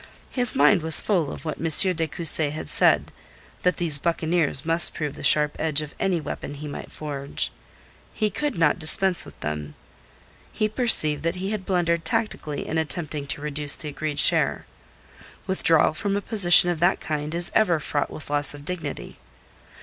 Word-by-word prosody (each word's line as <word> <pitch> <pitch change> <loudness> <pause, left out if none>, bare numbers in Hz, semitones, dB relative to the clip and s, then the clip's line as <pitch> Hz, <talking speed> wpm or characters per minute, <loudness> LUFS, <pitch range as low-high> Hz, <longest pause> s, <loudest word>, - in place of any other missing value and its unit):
His 245 -2 +1
mind 205 -8 +3
was 160 0 +3
full 175 -9 -1
of - - -11
what 155 - -5
M. 165 +4 +4
de 160 0 -2
Cussy 155 0 -1
had 155 +2 -8
said - - +1 0.5
that 180 -3 0
these 160 -5 +3
buccaneers 165 -2 -1
must 165 +1 +6
prove 150 -3 -4
the - - -11
sharp 150 -1 +3
edge 155 -1 -1
of 150 - -11
any 190 -3 -1
weapon 145 -1 -8
he 150 +1 -9
might 145 - -9
forge. 140 -2 -4 0.6
He 215 -2 -2
could 290 +2 -4
not 165 0 +1
dispense 180 +3 +2
with - - -15
them. 75 -1 -6 0.8
He 215 - -1
perceived 210 - +3
that 165 +3 -3
he 190 +2 -5
had 210 -3 -6
blundered 170 -3 -1
tactically 210 -10 -4
in 160 - -2
attempting 155 -2 -3
to 145 - -4
reduce 145 -1 0
the 150 - -7
agreed 150 0 -6
share. - - +3 0.8
Withdrawal 165 -5 +2
from 200 +4 -3
a - - -4
position 175 -5 +7
of 170 - -5
that 175 +3 +1
kind 150 +1 -5
is 175 0 0
ever 180 -7 +1
fraught 145 -1 -3
with 155 -1 -10
loss 145 0 +2
of 145 0 -13
dignity. 180 0 -7
160 Hz, 180 wpm, -23 LUFS, 150-180 Hz, 0.8 s, position